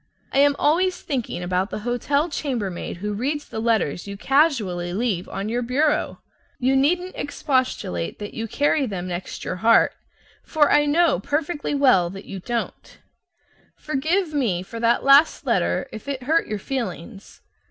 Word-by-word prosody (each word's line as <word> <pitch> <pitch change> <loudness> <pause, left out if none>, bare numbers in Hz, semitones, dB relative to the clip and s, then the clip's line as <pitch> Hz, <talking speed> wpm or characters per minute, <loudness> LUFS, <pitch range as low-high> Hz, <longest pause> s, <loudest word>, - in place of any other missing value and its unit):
I - - +3
am 285 0 +5
always 360 +4 +2
thinking 255 - -3
about 185 +2 -1
the - - -5
hotel 280 +6 0
chambermaid 235 - -4
who 210 +3 -3
reads 285 +8 -2
the 220 - -5
letters 220 -7 0
you 200 0 -6
casually 210 - +1
leave 200 -4 -1
on 195 +1 -4
your 240 +3 -1
bureau. 280 +5 0 0.3
You 260 +2 +1
needn't 355 +7 +1
expostulate 255 - -2
that 205 - -7
you 225 0 -4
carry 285 +3 +1
them 185 -4 -4
next 180 0 -6
your 185 - -3
heart, 225 +5 +4 0.5
for 300 -2 +2
I 295 0 +4
know 320 - +3
perfectly 295 - -2
well 250 -12 +4
that 195 +2 -9
you 195 - -7
don't. 235 +4 -5 0.8
Forgive 310 +4 -1
me 215 -12 0
for 230 +4 -8
that 235 +1 +2
last 275 +3 +5
letter - - 0
if 220 +5 -9
it 270 -2 -4
hurt 320 +6 +1
your 210 - -3
feelings. 205 -3 -6
245 Hz, 160 wpm, -23 LUFS, 200-290 Hz, 0.8 s, am